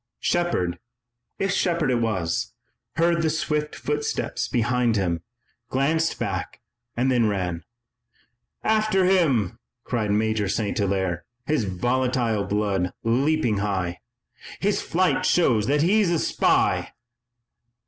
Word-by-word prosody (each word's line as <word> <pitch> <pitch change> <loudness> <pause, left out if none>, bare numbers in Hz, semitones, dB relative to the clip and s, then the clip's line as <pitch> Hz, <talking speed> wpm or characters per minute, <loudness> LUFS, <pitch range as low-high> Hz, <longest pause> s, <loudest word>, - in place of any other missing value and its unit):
Shepard, 90 - 0 0.6
if 195 -1 0
Shepard 170 -7 +1
it 120 -2 +1
was, 95 -7 -1 0.4
heard 170 +1 +2
the 160 - +1
swift 150 -1 -1
footsteps 150 0 -2
behind 120 -1 +1
him, 85 -5 0 0.5
glanced 160 +5 +1
back - - -4 0.4
and 130 +2 +2
then 120 -3 +3
ran. 90 -5 -2 1.0
"After 215 -3 +2
him!" 145 - +2 0.2
cried 115 -4 -2
Major 105 -1 +1
St. 105 0 -1
Hilaire, 95 -3 -1 0.2
his 150 -7 +1
volatile 120 +2 0
blood 100 -3 0
leaping 125 0 +1
high. 95 -4 -2 0.6
"His 205 +1 +1
flight 185 +2 +1
shows 115 -11 +3
that 145 +2 +2
he's 200 +2 +3
a 170 - +2
spy!" - - +1
120 Hz, 115 wpm, -24 LUFS, 100-160 Hz, 1.0 s, then